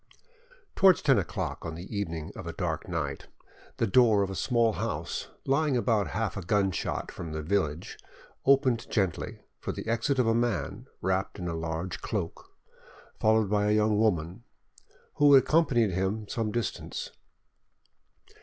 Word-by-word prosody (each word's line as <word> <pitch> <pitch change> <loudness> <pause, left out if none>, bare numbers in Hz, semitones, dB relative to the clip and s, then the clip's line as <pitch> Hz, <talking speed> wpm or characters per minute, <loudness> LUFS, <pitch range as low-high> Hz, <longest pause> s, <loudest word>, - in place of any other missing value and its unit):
Towards 190 -3 +5
ten 135 -7 +5
o'clock 95 - -4
on 80 -1 -5
the 85 +3 -8
evening 85 -6 -3
of - - -7
a - - -4
dark - - -3
night, - - -3 0.5
the - - +2
door 110 -1 +5
of 95 - -3
a - - -5
small 115 +1 +2
house - - -3 0.2
lying 140 0 +2
about 115 -4 +1
half 110 -4 -1
a 100 - -4
gunshot 95 0 -1
from 80 -2 -7
the 80 0 -4
village 85 -2 -1 0.4
opened 130 -4 +3
gently 95 -6 -1 0.2
for - - -3
the - - -6
exit 115 +5 0
of 125 - +3
a 115 - +3
man 115 -1 -1
wrapped 95 +1 -1
in 90 -3 -4
a 85 - -2
large 80 +2 -4
cloak, - - -4 0.7
followed 110 -1 +3
by 105 -1 +2
a 105 - +3
young 105 0 +2
woman, 95 -1 0 0.7
who 145 -1 +7
accompanied 135 - +4
him 95 +4 -1
some 110 -1 -2
distance. 120 0 -4
105 Hz, 155 wpm, -28 LUFS, 95-120 Hz, 0.7 s, who